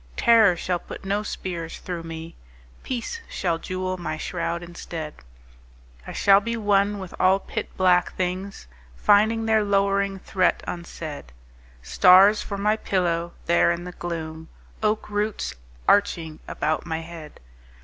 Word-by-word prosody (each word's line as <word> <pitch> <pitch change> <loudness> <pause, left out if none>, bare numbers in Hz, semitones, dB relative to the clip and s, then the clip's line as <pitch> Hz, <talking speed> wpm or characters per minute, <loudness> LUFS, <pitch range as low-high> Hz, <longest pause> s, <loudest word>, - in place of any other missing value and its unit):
Terror 220 -6 +6
shall 180 0 -1
put - - -10
no 200 +2 0
spears 175 -5 -5
through 175 -2 -5
me. 165 0 -8 0.5
Peace 260 - -4
shall 170 -3 -1
jewel 185 +1 -3
my 155 -2 -3
shroud 170 +1 -3
instead. 165 -3 -7 0.9
I - - -5
shall 195 0 +5
be 230 +2 -3
one 205 -1 +2
with 190 -2 -8
all 185 +1 +5
pit - - -5
black 180 -1 +3
things 185 - -3 0.3
Finding 220 - +3
their 220 -1 +3
lowering 200 -1 +1
threat 185 -1 0
unsaid: 160 - -7 0.5
Stars 185 - +6
for 200 - -5
my 210 +2 +1
pillow 170 -4 -1
there 170 0 +4
in 170 0 -3
the 180 - -7
gloom,— 160 -2 -6 0.3
Oak 215 0 0
roots 210 0 -2 0.3
arching 165 -6 +2
about 155 +1 -1
my 160 -1 -3
head! 165 -2 -10
185 Hz, 140 wpm, -24 LUFS, 170-200 Hz, 0.9 s, Terror